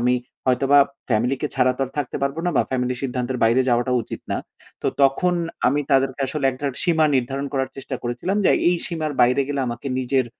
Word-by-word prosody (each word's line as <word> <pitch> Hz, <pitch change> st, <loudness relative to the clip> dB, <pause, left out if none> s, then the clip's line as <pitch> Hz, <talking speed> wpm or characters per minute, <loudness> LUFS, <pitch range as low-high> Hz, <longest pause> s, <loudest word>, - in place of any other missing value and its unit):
আমি 125 Hz, +1 st, +3 dB, 0.3 s
হয়তোবা 135 Hz, +3 st, +4 dB, 0.3 s
ফ্যামিলিকে 125 Hz, +5 st, +1 dB
ছাড়া 130 Hz, -1 st, +3 dB
তো 135 Hz, -, -1 dB
আর 130 Hz, -, -13 dB
থাকতে 140 Hz, -4 st, -2 dB
পারব 140 Hz, +1 st, 0 dB
না, -, -, +2 dB
বা -, -, +5 dB
ফ্যামিলির 125 Hz, -1 st, -1 dB
সিদ্ধান্তের 125 Hz, -1 st, -2 dB
বাইরে 115 Hz, +3 st, +4 dB
যাওয়াটা 120 Hz, +1 st, +2 dB
উচিত -, -, -7 dB
না। -, -, 0 dB, 0.5 s
তো -, -, -1 dB, 0.2 s
তখন 160 Hz, +7 st, +3 dB, 0.3 s
আমি 145 Hz, +3 st, +1 dB
তাদেরকে 135 Hz, 0 st, +2 dB
আসলে 145 Hz, +1 st, -4 dB
একটা 130 Hz, +3 st, -5 dB, 0.2 s
সীমা 160 Hz, -3 st, +3 dB
নির্ধারণ 135 Hz, +3 st, -2 dB
করার 135 Hz, -1 st, -1 dB
চেষ্টা 135 Hz, -1 st, -5 dB
করেছিলাম। 120 Hz, +11 st, -2 dB
যে -, -, +5 dB, 0.2 s
এই 175 Hz, -, +3 dB
সীমার 155 Hz, -3 st, -3 dB
বাইরে 125 Hz, +3 st, +4 dB
গেলে 140 Hz, -1 st, -1 dB
আমাকে 120 Hz, +3 st, -5 dB
নিজের 130 Hz, 0 st, +1 dB
130 Hz, 195 wpm, -22 LUFS, 125-140 Hz, 0.5 s, বা